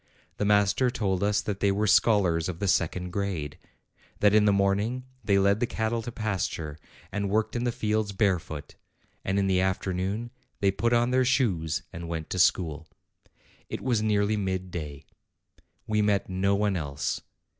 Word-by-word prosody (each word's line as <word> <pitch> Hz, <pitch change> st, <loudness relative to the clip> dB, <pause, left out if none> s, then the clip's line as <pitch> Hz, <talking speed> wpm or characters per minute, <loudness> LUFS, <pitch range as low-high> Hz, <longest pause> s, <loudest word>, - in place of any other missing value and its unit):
The 105 Hz, -, 0 dB
master 105 Hz, +4 st, +3 dB
told 95 Hz, -6 st, -1 dB
us 105 Hz, +1 st, +2 dB
that 100 Hz, -2 st, -3 dB
they 100 Hz, -1 st, +3 dB
were 105 Hz, +2 st, 0 dB
scholars 95 Hz, -5 st, +3 dB
of 85 Hz, -, -4 dB
the 100 Hz, -, -2 dB
second 90 Hz, 0 st, 0 dB
grade; 90 Hz, -7 st, -3 dB, 0.6 s
that 105 Hz, 0 st, +4 dB
in 105 Hz, -1 st, +5 dB
the 105 Hz, -, +5 dB
morning 100 Hz, +6 st, +1 dB, 0.2 s
they 100 Hz, -2 st, +3 dB
led 100 Hz, +1 st, +3 dB
the 120 Hz, -, +1 dB
cattle 110 Hz, +1 st, -1 dB
to 120 Hz, -, -6 dB
pasture, 95 Hz, -9 st, -3 dB, 0.3 s
and 100 Hz, -1 st, -2 dB
worked 110 Hz, +3 st, 0 dB
in 120 Hz, -, 0 dB
228 120 Hz, -, +1 dB
APRIL -, -, 0 dB
the 105 Hz, -2 st, -2 dB
fields 100 Hz, -1 st, -8 dB
barefoot; 90 Hz, -7 st, -1 dB, 0.5 s
and 95 Hz, +1 st, -1 dB
in 100 Hz, -, +2 dB
the 95 Hz, -1 st, +2 dB
afternoon 95 Hz, +4 st, -1 dB, 0.3 s
they 100 Hz, -1 st, +3 dB
put 115 Hz, +5 st, 0 dB
on 120 Hz, +1 st, +3 dB
their 130 Hz, 0 st, +3 dB
shoes 95 Hz, -, +1 dB
and 85 Hz, 0 st, -6 dB
went 80 Hz, -2 st, -5 dB
to 90 Hz, -, -2 dB
school. 80 Hz, -3 st, +2 dB, 0.8 s
It -, -, -4 dB
was 120 Hz, -5 st, +1 dB
nearly 105 Hz, 0 st, +1 dB
mid 95 Hz, -2 st, -2 dB
day. 75 Hz, -4 st, -6 dB, 0.8 s
We 105 Hz, 0 st, +1 dB
met 105 Hz, -1 st, +1 dB
no 95 Hz, +2 st, +1 dB
one 100 Hz, -1 st, +1 dB
else. 70 Hz, -5 st, -3 dB
100 Hz, 180 wpm, -27 LUFS, 90-105 Hz, 0.8 s, in